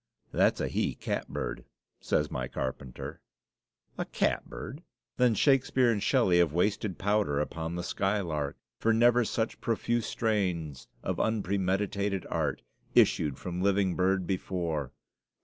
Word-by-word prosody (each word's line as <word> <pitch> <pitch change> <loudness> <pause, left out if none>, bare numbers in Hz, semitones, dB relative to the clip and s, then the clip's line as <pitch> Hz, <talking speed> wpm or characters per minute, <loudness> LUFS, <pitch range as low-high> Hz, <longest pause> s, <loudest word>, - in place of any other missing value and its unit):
"That's - - +3
a - - 0
he - - -1
catbird," - - -3 0.4
says - - 0
my 65 -1 -2
carpenter. 65 -1 -5 0.8
A - - 0
catbird? 145 - -2 0.4
Then 125 -3 +4
Shakespeare 130 0 +4
and 105 -3 -1
Shelley 100 -7 +3
have 85 -3 +4
wasted 100 +2 0
powder 100 -8 +1
upon 80 +2 -3
the 90 - -3
skylark; 85 -8 -1 0.2
for 115 - +3
never 120 +2 +5
such 110 0 -2
"profuse 115 0 0
strains 90 - -1 0.2
of - - -2
unpremeditated 100 -1 0
art" - - -1 0.3
issued 70 -4 +4
from 90 0 -4
living 95 -1 +2
bird 95 0 +2
before. 85 -7 -2
95 Hz, 125 wpm, -29 LUFS, 85-110 Hz, 0.8 s, never